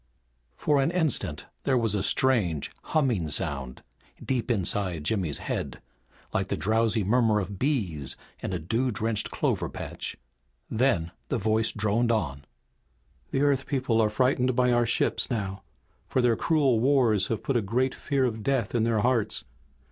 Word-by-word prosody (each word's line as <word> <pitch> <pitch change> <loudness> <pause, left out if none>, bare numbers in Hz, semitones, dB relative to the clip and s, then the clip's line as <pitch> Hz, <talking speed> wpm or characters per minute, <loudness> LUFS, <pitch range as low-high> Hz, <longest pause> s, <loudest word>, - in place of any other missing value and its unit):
For 145 - +2
an 135 - +2
instant 150 - 0 0.2
there 130 - +2
was 115 -4 +1
a 105 - 0
strange, 95 - +2
humming 120 - +1
sound 70 -2 -3 0.4
deep 130 -2 -1
inside 95 -6 0
Jimmy's 85 -4 0
head, - - -4 0.5
like - - 0
the - - -2
drowsy 110 +5 +1
murmur 110 +1 +3
of 100 -1 -5
bees 90 - -1 0.2
in - - -3
a 90 - -1
dew 115 +11 -1
drenched 110 -1 -1
clover - - -1
patch. - - -5 0.5
Then 110 -9 +1 0.2
the 135 - 0
voice 110 +1 +1
droned 110 +3 +1
on. 75 - -2 0.8
"The 135 - 0
Earth 140 -2 +2
people 125 -5 +1
are 110 - +3
frightened 125 +2 +1
by 125 0 +3
our 120 -1 +3
ships 120 - +1
now, 100 -5 -3 0.5
for - - 0
their 120 -2 +3
cruel 140 -5 +2
wars 120 -6 +3
have 115 - -3
put 135 - -1
a 120 - +3
great 125 +6 0
fear 140 -3 0
of 110 -3 -2
death 130 -3 0
in 120 - +2
their 110 -1 +2
hearts. 120 -3 +1
115 Hz, 160 wpm, -27 LUFS, 100-130 Hz, 0.8 s, murmur